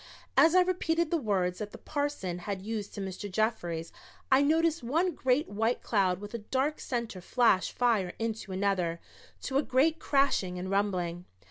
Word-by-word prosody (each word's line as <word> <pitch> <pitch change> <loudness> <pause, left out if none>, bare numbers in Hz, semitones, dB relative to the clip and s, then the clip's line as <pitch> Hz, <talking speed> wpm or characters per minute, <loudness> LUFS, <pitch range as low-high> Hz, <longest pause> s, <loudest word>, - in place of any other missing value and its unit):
As 330 +2 +6
I 370 - +7
repeated 340 -3 0
the 340 - +2
words 185 -7 0
that 210 -1 -5
the - - -8
parson 285 - -3
had 190 +1 -5
used 215 -1 -4
to 200 - -4
Mr. 195 +1 -5
Jeffries 180 -6 -1 0.4
I 265 +1 +6
noticed 320 +2 +2
one 325 +9 +1
great 260 +3 +1
white 225 +4 -1
cloud 190 -5 +1
with 205 +2 -9
a 235 - -3
dark 270 +7 -1
center 235 -7 -4
flash 210 -1 +2
fire 220 -7 +1
into 225 -3 -3
another, 185 -3 0 0.4
to 270 0 0
a - - +3
great 305 +4 +2
crashing 275 -13 +1
and 185 +1 -4
rumbling. 180 -3 -1
220 Hz, 170 wpm, -30 LUFS, 190-280 Hz, 0.4 s, I